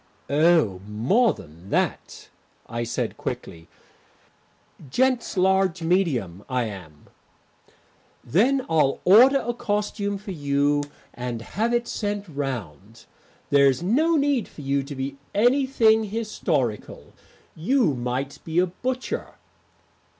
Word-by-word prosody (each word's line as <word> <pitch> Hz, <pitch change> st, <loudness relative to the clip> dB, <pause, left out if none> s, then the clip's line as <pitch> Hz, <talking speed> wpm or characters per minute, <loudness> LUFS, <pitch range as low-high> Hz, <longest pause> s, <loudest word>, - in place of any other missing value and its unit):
"Oh, 150 Hz, -, +3 dB
more 165 Hz, -, +2 dB
than 85 Hz, +3 st, -14 dB
that," -, -, -2 dB, 0.4 s
I 115 Hz, +1 st, -3 dB
said 115 Hz, 0 st, -3 dB
quickly. 80 Hz, -1 st, -6 dB, 1.2 s
"Gents' 255 Hz, -, +1 dB
large 190 Hz, -2 st, +2 dB
medium, 135 Hz, -, 0 dB
I 125 Hz, -1 st, 0 dB
am." 90 Hz, -9 st, -9 dB, 1.2 s
"Then 250 Hz, -, +2 dB
I'll 150 Hz, -4 st, +2 dB
order 255 Hz, +8 st, +7 dB
a 240 Hz, -, 0 dB
costume 205 Hz, -3 st, -2 dB
for 200 Hz, 0 st, -8 dB
you 145 Hz, -2 st, +1 dB, 0.3 s
and 120 Hz, -2 st, -5 dB
have 225 Hz, -, -1 dB
it 240 Hz, 0 st, 0 dB
sent 205 Hz, -1 st, -3 dB
round. 115 Hz, -, -6 dB, 0.5 s
There's 140 Hz, +1 st, +4 dB
no 305 Hz, -, +2 dB
need 280 Hz, -7 st, +1 dB
for -, -, -12 dB
you 140 Hz, 0 st, 0 dB
to 140 Hz, +1 st, -8 dB
be 135 Hz, +1 st, -4 dB, 0.2 s
anything 235 Hz, -1 st, +3 dB
historical; 175 Hz, -, -3 dB, 0.4 s
you 210 Hz, -, +1 dB
might 125 Hz, +3 st, -3 dB
be 160 Hz, +1 st, -4 dB
a 180 Hz, -, +5 dB
butcher." 250 Hz, +8 st, -4 dB
165 Hz, 115 wpm, -24 LUFS, -, 1.2 s, order